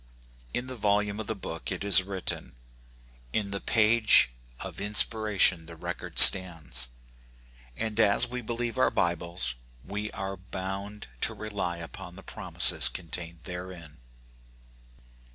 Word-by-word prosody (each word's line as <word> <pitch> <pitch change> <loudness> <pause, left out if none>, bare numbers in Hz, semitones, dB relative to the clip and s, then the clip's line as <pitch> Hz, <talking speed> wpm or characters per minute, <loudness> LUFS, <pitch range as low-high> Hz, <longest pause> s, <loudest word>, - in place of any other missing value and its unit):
" - - -29 0.2
In 120 - -4
the 130 - -9
volume 105 -1 -2
of 110 - -7
the 110 - -4
book 80 -4 -8
it 95 0 -6
is 100 -1 +3
written.*' 95 -1 -5 0.8
In 100 -2 -3
the 100 - -6
page 110 - +3 0.3
of - - -9
inspiration 105 -4 0
the 85 - -12
record 80 - -9
stands; 80 -10 +8 0.9
and 110 -1 -4
as 105 +2 +4
we 125 0 -7
believe 120 +2 -6
our - - +2
Bibles, 85 -6 -2 0.3
we 105 +1 -6
are 95 -1 -7
bound 95 +3 -8 0.2
to - - +1
rely 100 -5 -6
upon 85 -1 -11
the - - -14
promises - - +3
contained 85 -1 -7
therein. 90 -4 -10
100 Hz, 135 wpm, -26 LUFS, 85-105 Hz, 0.9 s, stands